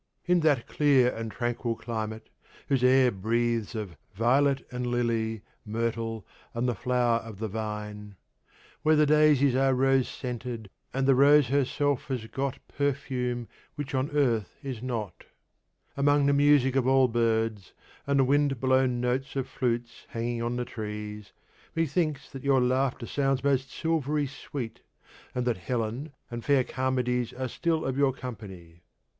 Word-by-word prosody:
In 180 0 +3
that 145 -7 +2
clear 135 -4 +3
and 115 -1 -5
tranquil 120 0 -2
climate, 110 -1 -5 0.4
whose 135 -3 +2
air 130 0 +5
breathes 115 +2 -1
of 100 -7 -5 0.2
'violet 135 +5 +2
and 125 0 -3
lily, 115 -3 -1 0.2
myrtle, 115 0 -3 0.3
and 120 +2 0
the 120 - +1
flower 120 -1 +1
of 115 -3 -10
the 110 +2 -3
vine,' 105 -1 -5 0.7
Where 155 0 +4
the 150 0 +5
daisies 150 -3 +4
are 135 0 +3
rose 135 0 +3
scented, 120 -4 -6 0.2
And 135 +1 0
the 135 - +5
Rose 140 0 +6
herself 140 0 +1
has 125 -5 -3
got 135 +3 -3
Perfume 130 -4 -2 0.3
which 145 -1 -5
on 130 +1 0
earth 120 -9 0
is 130 -5 -5
not, 115 -8 -4 0.7
among 145 +1 +3
the 140 - +4
music 140 -2 +4
of 130 -2 +2
all 130 0 +5
birds, 115 -4 0 0.3
and 140 0 +2
the - - +5
wind 140 -1 +2
blown 130 -1 +2
notes 130 +3 -1
of 135 -2 -1
flutes 120 -2 -3
hanging 115 0 -3
on 120 +1 -1
the 125 0 -2
trees, 105 -2 -6 0.4
methinks 155 -2 0
that 135 - -8
your 140 -1 +4
laughter 130 0 +1
sounds 135 0 0
most 135 -2 +1
silvery 150 -2 0
sweet, 130 -4 -7 0.5
and 125 -1 -1
that 120 -3 +1
Helen 120 - -3 0.2
and 120 -1 -5
fair 140 -3 +3
Charmides 125 -2 -1
are 130 0 -3
still 160 +5 -1
of 135 +1 -1
your 140 -2 +3
company. 95 -10 -9
125 Hz, 150 wpm, -28 LUFS, 115-140 Hz, 0.7 s, Rose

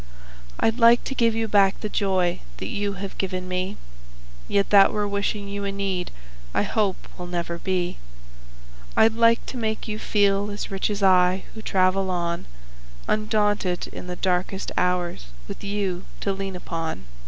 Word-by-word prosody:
I'd 225 +2 +2
like 235 +1 +6
to - - -4
give 230 -3 +2
you 225 0 0
back 200 -2 +4
the - - -1
joy 190 -4 +1 0.2
that - - -5
you 205 0 -1
have 195 +1 -7
given 185 -1 -2
me, 185 +2 -2 0.7
Yet 200 -1 +1
that 200 -1 +7
were 210 -1 0
wishing 200 0 -2
you 200 0 -4
a 200 - -1
need 195 -2 -2 0.5
I - - +3
hope 205 -4 -1
will 180 - -5
never 170 -1 -3
be; 180 -1 -1 1.0
I'd 220 0 +6
like 230 0 +4
to 260 - -6
make 220 -1 -2
you 215 0 -3
feel 205 -1 +2
as 205 0 -5
rich 195 +1 -1
as 205 -1 -2
I, 185 0 +4
who 220 - -8
travel 190 -1 +2
on 170 -1 -2 0.6
Undaunted 210 -4 +1
in - - -8
the 180 - -4
darkest 185 +1 -1
hours 180 - 0 0.2
with - - -8
you 200 -3 -2 0.2
to 200 - 0
lean 195 -1 -4
upon. 165 - -4
195 Hz, 165 wpm, -24 LUFS, 180-210 Hz, 1.0 s, that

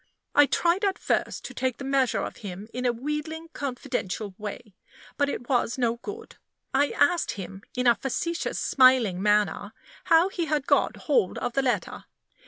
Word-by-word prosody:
I 290 0 +6
tried 345 +7 +1
at 395 -1 +1
first - - -1
to - - -7
take 260 -3 -1
the - - -7
measure 270 -2 +1
of - - -6
him 200 0 -7
in 250 0 -1
a - - +3
wheedling, 300 +6 -4
confidential 220 -7 -4
way; 210 0 -7 0.4
but 285 -1 +1
it 245 - -5
was 245 -1 +1
no 235 -2 +1
good. 420 - -9 0.4
I 285 +2 +3
asked 345 +2 +2
him, 195 -1 -8 0.2
in 250 - 0
a 240 - +7
facetious, 335 +8 -3
smiling 255 -8 +4
manner, 210 0 +1 0.3
how 330 +3 +5
he 350 -3 -2
had 300 -3 -1
got - - +2
hold 475 - +2
of 245 - -3
the 275 - +2
letter. 255 -2 -2
260 Hz, 175 wpm, -26 LUFS, 230-300 Hz, 0.4 s, a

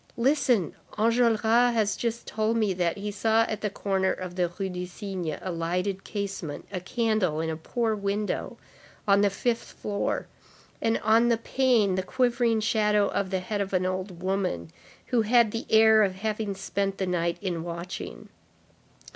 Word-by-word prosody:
Listen, 245 - +2 0.2
Enjolras 230 0 +3 0.3
has 210 -2 +2
just 235 0 -3
told 220 +1 0
me 215 -4 +2
that 175 -1 0
he 205 +1 -4
saw 220 +2 +3
at 220 -2 -3
the 210 - 0
corner 190 -1 0
of 180 -1 -5
the 175 -2 0
Rue 195 -2 -1
du 180 -1 -5
Cygne 180 -5 -4
a 185 - -4
lighted 180 +4 -2
casement, 195 -7 -5
a 185 - -3
candle 215 -5 0
in 160 0 -1
a - - -3
poor 225 +8 -1
window, 205 0 -2 0.5
on 200 0 +5
the 205 - +4
fifth 230 +4 -2
floor, 200 -1 -2 0.6
and 225 0 +2
on 225 +2 +5
the 235 - +3
pane 230 -4 +2
the 190 - 0
quivering 240 0 +1
shadow 210 -2 +2
of 195 - -1
the 190 -1 -1
head 205 +2 -2
of 195 0 -3
an 185 0 +2
old 185 -1 -4
woman, 185 - -1 0.4
who 240 -2 +3
had 230 0 +4
the 230 - -4
air 220 0 +6
of 190 -3 +2
having 210 0 -2
spent 195 0 -2
the 190 - -1
night 170 -1 0
in 175 -4 -3
watching. 170 +1 -6
200 Hz, 170 wpm, -27 LUFS, 185-220 Hz, 0.6 s, air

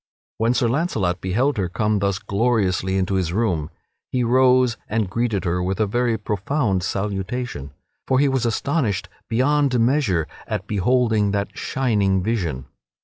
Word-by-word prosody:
When 115 +2 +2
Sir 125 - +2
Launcelot 115 - 0
beheld 120 +10 0
her 95 -3 -1
come 105 +3 0
thus 100 -1 0
gloriously 100 -3 0
into 95 +1 0
his 95 -3 0
room 90 -7 0 0.4
he 125 -1 +1
rose 125 0 +4
and 110 -1 0
greeted 110 -1 -1
her 90 +1 0
with 95 +1 -2
a 110 - +3
very 120 +2 0
profound 105 0 -1
salutation, 100 - -3 0.4
for 130 - +2
he 140 +2 +4
was 135 -2 0
astonished 115 - -1 0.2
beyond 130 +2 +2
measure 115 - +2 0.2
at - - -3
beholding 110 0 +2
that 100 0 -2
shining 100 -8 0
vision. 90 - -2
110 Hz, 145 wpm, -22 LUFS, 95-125 Hz, 0.4 s, rose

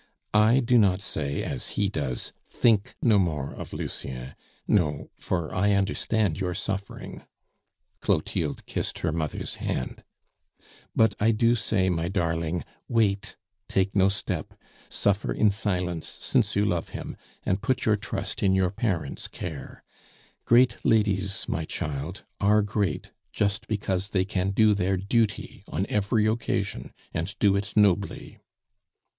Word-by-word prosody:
"I 110 +5 +5
do 120 0 +4
not 95 -3 +4
say 75 -7 -2
as - - -3
he 100 - +3
does, 70 -10 -3 0.2
'Think 110 -4 +2
no 110 -5 +5
more 75 -7 -1
of - - -8
Lucien.' 65 0 -5 0.3
No 75 -8 +1
for 85 -3 -2
I 100 +2 +3
understand 100 -1 +1
your 90 -2 -1
suffering" 100 0 -4 0.8
Clotilde - - -1
kissed - - -3
her - - +2
mother's 80 -2 -3
hand - - -3 0.9
"but 110 -2 +4
I 110 - +4
do 115 +1 +4
say, 110 -4 +1
my 85 -1 -1
darling, 85 -3 -1 0.2
Wait, 105 -4 +1 0.3
take 95 +1 +1
no 95 -1 +5
step, 100 +1 -3 0.3
suffer 100 0 +1
in 105 -2 +3
silence 90 -5 -1
since - - 0
you 100 +1 +3
love 90 -4 -1
him, - - -6 0.3
and 95 +1 +1
put 125 +3 0
your 110 - +4
trust 100 - -4
in 95 -1 +3
your 95 -1 +2
parents' 90 - -2
care. 80 -6 -7 0.6
Great 120 -1 +4
ladies, 100 -3 +1
my - - -1
child, 75 +5 -4 0.2
are 105 +1 +4
great 100 -5 -1 0.2
just 105 +3 0
because 100 -2 -1
they 95 -3 +1
can 95 -1 -1
do 105 +2 +4
their 95 -1 +1
duty 110 +3 0
on 90 +6 -1
every 105 +1 +2
occasion, 110 +2 -1 0.2
and 85 +4 -3
do 100 -2 +4
it 100 +1 -2
nobly." 100 -2 +2
100 Hz, 140 wpm, -26 LUFS, 90-105 Hz, 0.9 s, I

